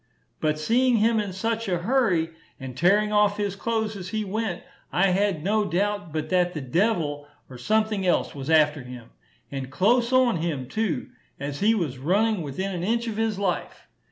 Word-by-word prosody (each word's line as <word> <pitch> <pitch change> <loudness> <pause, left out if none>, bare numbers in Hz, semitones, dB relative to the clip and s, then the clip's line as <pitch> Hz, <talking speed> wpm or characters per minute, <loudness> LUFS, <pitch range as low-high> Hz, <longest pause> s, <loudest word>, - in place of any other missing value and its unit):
But 155 0 0
seeing 240 +9 +2
him 225 +1 +3
in 205 -2 -2
such 225 +4 -2
a 180 - +1
hurry, 180 -5 +1 0.3
and 130 -2 -7
tearing 205 +8 +3
off 210 -1 +3
his 205 -2 -2
clothes 220 0 -2
as 185 -2 -7
he 215 +1 -2
went, 205 -2 -3 0.3
I 195 +2 +3
had 190 -4 +1
no 210 +3 +2
doubt 205 0 -1
but 155 0 -3
that 180 -1 +1
the - - -2
devil 145 - 0 0.2
or 125 - -10
something 215 - +1
else 175 - +1
was 140 +1 -6
after 155 -2 +4
him 125 -2 -10 0.4
and 135 -2 -5
close 235 - +2
on 255 -6 +4
him, 155 -6 -3
too 180 - -2 0.3
as 140 +1 -4
he 220 +3 +3
was 150 - -2
running 200 +7 +1
within 175 +7 -4
an 175 -1 -3
inch 230 +4 0
of 225 -2 -4
his 220 -2 0
life. 190 -3 -3
190 Hz, 185 wpm, -25 LUFS, 155-220 Hz, 0.4 s, after